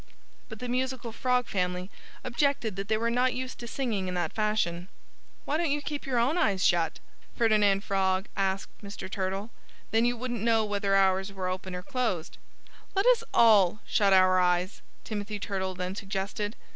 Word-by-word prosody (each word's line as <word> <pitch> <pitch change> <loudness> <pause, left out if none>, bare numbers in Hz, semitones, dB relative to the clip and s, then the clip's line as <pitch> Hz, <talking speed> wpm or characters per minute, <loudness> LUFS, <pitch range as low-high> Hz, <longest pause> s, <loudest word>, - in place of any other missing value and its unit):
But 220 - -7
the 250 - -6
musical 255 -1 -2
Frog 250 +1 +1
family 180 0 -2 0.3
objected 255 -4 0
that 195 +1 -4
they 220 - +2
were 230 +1 0
not 250 +1 +2
used 255 0 -5
to 240 - -7
singing 225 -7 -2
in 180 - -3
that 175 -2 -1
fashion. 210 -5 0 0.6
"Why 295 - 0
don't 335 -1 0
you 290 +1 +1
keep 290 0 -5
your 255 -2 0
own 265 +9 +2
eyes 195 - +2
shut?" 170 -2 +2 0.4
Ferdinand 210 -3 +3
Frog 190 -1 +1
asked 195 -1 -1
Mr. 200 -1 -7
Turtle. 195 +3 -3 0.4
"Then 225 +1 +3
you 245 0 +1
wouldn't 240 -2 -4
know 225 -1 +3
whether 200 -1 0
ours 190 0 +3
were 190 -2 -3
open 185 0 -4
or 180 - -6
closed." 220 -8 -2 0.6
"Let 390 - +2
us - - +5
all 210 -4 +5
shut 200 -2 +2
our 185 -1 +5
eyes!" 180 +1 +1 0.2
Timothy 210 -1 -4
Turtle 190 -2 -3
then 180 +1 -3
suggested. 200 +2 -4
205 Hz, 175 wpm, -28 LUFS, 190-240 Hz, 0.6 s, us